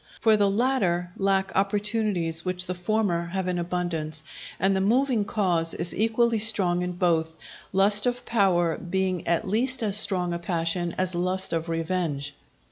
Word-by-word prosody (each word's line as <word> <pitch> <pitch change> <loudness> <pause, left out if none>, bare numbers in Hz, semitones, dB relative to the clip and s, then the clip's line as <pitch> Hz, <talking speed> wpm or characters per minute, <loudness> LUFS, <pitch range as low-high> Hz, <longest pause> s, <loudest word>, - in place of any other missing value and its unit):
For 220 -1 +4
the 205 -1 +2
latter 195 -6 0
lack 195 -1 0
opportunities 200 -4 0
which 185 0 -2
the 180 - -3
former 180 -2 -1
have 185 +1 -3
in 180 -1 -1
abundance; 170 -3 -2 0.4
and 195 0 +2
the 190 - 0
moving 235 +1 +1
cause 175 -6 +1
is 170 +1 -1
equally 225 +1 +1
strong 195 -5 +3
in 180 0 -3
both, 165 -2 0 0.4
lust 205 +4 +3
of 245 0 -2
power 180 -7 +1
being 185 0 -2
at 170 +5 0
least 240 +5 0
as 205 -3 +3
strong 180 -4 +3
a 170 - -3
passion 170 0 -2
as 185 0 -1
lust 185 +2 -1
of 165 0 -2
revenge. 165 -4 -2
185 Hz, 160 wpm, -25 LUFS, 170-210 Hz, 0.4 s, For